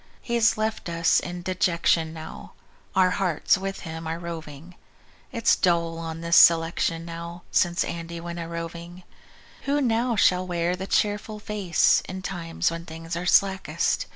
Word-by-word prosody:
He's 235 -2 +2
left 215 -3 -2
us 170 0 +3
in 175 0 -6
dejection 170 -3 +1
now; 160 -1 -10 0.4
Our 185 -1 +4
hearts 180 -5 +1
with 195 +1 -5
him 160 -1 -7
are 165 +1 -3
roving. 165 -1 -8 0.6
It's 230 -4 +3
dull 170 -2 +1
on 165 0 -6
this 170 0 +3
selection 165 0 +4
now, 170 +1 -8
Since 175 0 +2
Andy 170 0 -6
went 170 0 -6
a 165 - -5
droving. 170 +1 -7 0.6
Who 285 +1 +1
now 240 -2 +1
shall 185 -2 +3
wear 175 0 0
the 190 +1 -6
cheerful 210 +1 0
face 205 -4 +2
In 185 0 -6
times 170 -4 -2
when 165 0 -6
things 165 +1 -6
are 175 +1 -3
slackest? 190 0 +2
170 Hz, 155 wpm, -25 LUFS, 165-190 Hz, 0.6 s, Our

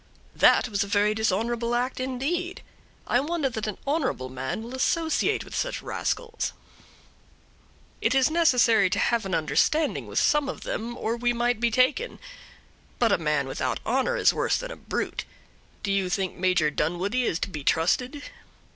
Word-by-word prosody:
"That - - +5
was 200 -3 0
a - - -6
very 205 +1 +2
dishonorable 230 +3 0
act, 250 +2 -1
indeed; 285 +9 -2 0.4
I 245 - +2
wonder 300 0 -1
that 220 -1 -3
an 210 - -4
honorable 275 - -1
man 130 +10 -4
will 235 +2 -8
associate 320 +5 +1
with - - -12
such - - -2
rascals." 465 -1 -3 1.5
"It - - +2
is 265 +2 +4
necessary 250 - +4
to - - -1
have 230 -4 +1
an 185 - -1
understanding 300 - +1
with - - -6
some 295 -2 +3
of - - -6
them, 235 +2 -4
or 225 +1 -1
we 240 0 0
might 240 -1 0
be 235 0 +2
taken; 260 - +1 0.8
but 235 -3 +3
a 200 - +3
man 150 -4 0
without 130 -1 -2
honor 265 - +1
is - - +4
worse - - +1
than - - -6
a - - -6
brute. - - -3 0.6
Do 200 - -1
you 195 -2 +1
think 190 0 -1
Major 180 -4 +2
Dunwoodie 185 +11 0
is 165 - 0
to 195 - -3
be 150 -4 -6
trusted?" 250 - +1
235 Hz, 170 wpm, -26 LUFS, 190-270 Hz, 1.5 s, That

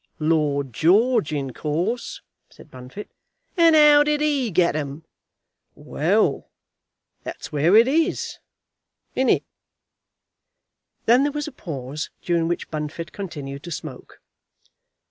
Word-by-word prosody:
"Lord 150 -4 0
George, 200 - +3
in 135 -4 -3
course," 175 - -3 0.3
said - - -17
Bunfit. 130 +11 -10 0.4
"And 335 -3 +5
how 300 -1 +7
did 295 0 +1
he 290 -5 +1
get 170 -4 +2
'em?" 145 +1 -4 0.7
"Well; - - 0 0.7
that's - - -8
where 155 +6 +3
it 230 +2 +7
is; 315 +4 0 0.7
isn't 260 -1 +1
it?" - - +3 1.6
Then 240 +3 +5
there 290 +1 +1
was 295 +1 -4
a - - -6
pause, 150 - -6
during 170 -2 +1
which 175 - -3
Bunfit 155 +2 -5
continued 145 -8 -7
to 175 - -9
smoke. 150 -5 -9
170 Hz, 120 wpm, -23 LUFS, -, 1.6 s, how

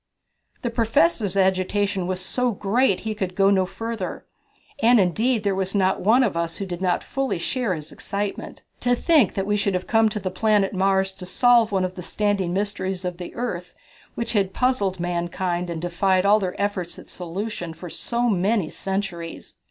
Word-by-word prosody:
The 240 - -1
Professor's 230 - +2
agitation 190 0 +1
was 185 0 -2
so 245 +6 0
great 210 +7 +2
that - - -13
he 220 0 -2
could 190 -3 -4
go 195 0 +4
no 190 -2 +3
further. 225 -1 -5 0.6
And 235 +1 +6
indeed 215 +5 +2
there 200 -1 +1
was 190 +1 -1
not 190 -1 +2
one 230 +7 +5
of 210 -8 0
us 170 0 -2
who 200 - -4
did 180 -1 -6
not 180 -2 +1
fully 270 -7 -2
share 230 +2 -1
his 155 -1 -8
excitement. 200 0 -4 0.2
To 245 0 +2
think 290 - +3
that 195 - -1
we 205 +1 +1
should 200 -2 0
have 180 - -2
come 225 0 +3
to 210 0 -3
the 185 -2 -3
planet 210 -1 +2
Mars 190 0 +2
to 190 -1 -10
solve 235 +3 +4
one 190 -2 +1
of 185 - -4
the 185 - -8
standing 200 -1 0
mysteries 190 -1 -2
of 180 -1 -3
the 175 -1 -8
earth, 180 -8 -4 0.4
which 235 - -3
had 195 -3 +1
puzzled 205 -8 +1
mankind 175 0 -2
and 170 -1 -3
defied 185 +2 +1
all 210 +2 +6
their 185 -2 -3
efforts 195 -4 -2
at - - -12
solution 180 0 -5
for 170 +2 -9
so 235 +7 -1
many 200 -3 +1
centuries! 190 -4 -4
195 Hz, 190 wpm, -23 LUFS, 180-220 Hz, 0.6 s, And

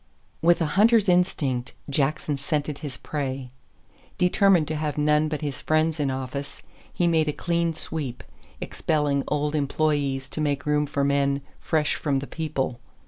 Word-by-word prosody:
With 170 +1 +4
a 160 +6 +1
hunter's 225 -1 +5
instinct, 145 -9 +1
Jackson 145 +1 0
scented 145 0 -2
his 145 -3 -6
prey. 135 -3 -4 0.7
Determined 180 -2 +4
to 155 - -1
have 150 0 -2
none 150 +1 +3
but 150 -1 -3
his 145 -4 -4
friends 155 0 +1
in 145 -2 +1
office, 135 +2 -5 0.3
he 175 - 0
made 160 -2 +3
a - - +2
clean 170 +1 -1
sweep, 145 -7 -4 0.4
expelling 145 -3 0
old 150 0 0
employees 140 -2 0
to 155 - -4
make 145 -1 0
room 150 0 +2
for 140 -1 -1
men 140 0 +2 0.2
"fresh 155 -2 +1
from 140 -3 0
the 135 - -3
people." 140 -6 -3
150 Hz, 155 wpm, -25 LUFS, 140-155 Hz, 0.7 s, hunter's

